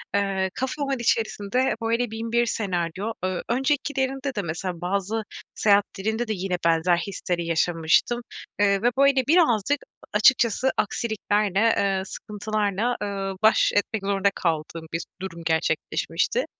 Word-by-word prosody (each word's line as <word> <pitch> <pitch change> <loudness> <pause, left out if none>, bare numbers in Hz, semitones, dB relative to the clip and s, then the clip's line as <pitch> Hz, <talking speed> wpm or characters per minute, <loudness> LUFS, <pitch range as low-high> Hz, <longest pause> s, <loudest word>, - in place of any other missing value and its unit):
eee, 195 -1 +1
kafamın 275 0 -2
içerisinde 230 +1 0
böyle 230 +1 0
1001 230 +2 0
senaryo, 190 -1 -2
eee, 185 -1 -1
öncekilerinde 270 +1 0
de 205 - 0
mesela 170 0 -4
bazı 200 +4 -1 0.3
seyahatlerimde 210 +2 +1
de 220 - 0
yine 185 -2 -2
benzer 165 +1 +3
hisleri 175 -1 -3
yaşamıştım. 165 +7 +2 0.4
Iıı, 200 -1 +3
ve 245 - +3
böyle 275 -2 +4
birazcık 290 - +3
a - - -6
açıkçası 240 +2 +4
aksiliklerle, 210 -3 0
eee, 200 -3 +2
sıkıntılarla, 210 +2 -2
ııı, 195 -1 -3
baş 220 - +5
etmek 205 0 0
zorunda 200 0 +2
kaldığım 165 -1 -2
bir 165 0 -2 0.2
durum 170 -3 -6
gerçekleşmişti. 165 - 0
205 Hz, 125 wpm, -24 LUFS, 190-235 Hz, 0.4 s, baş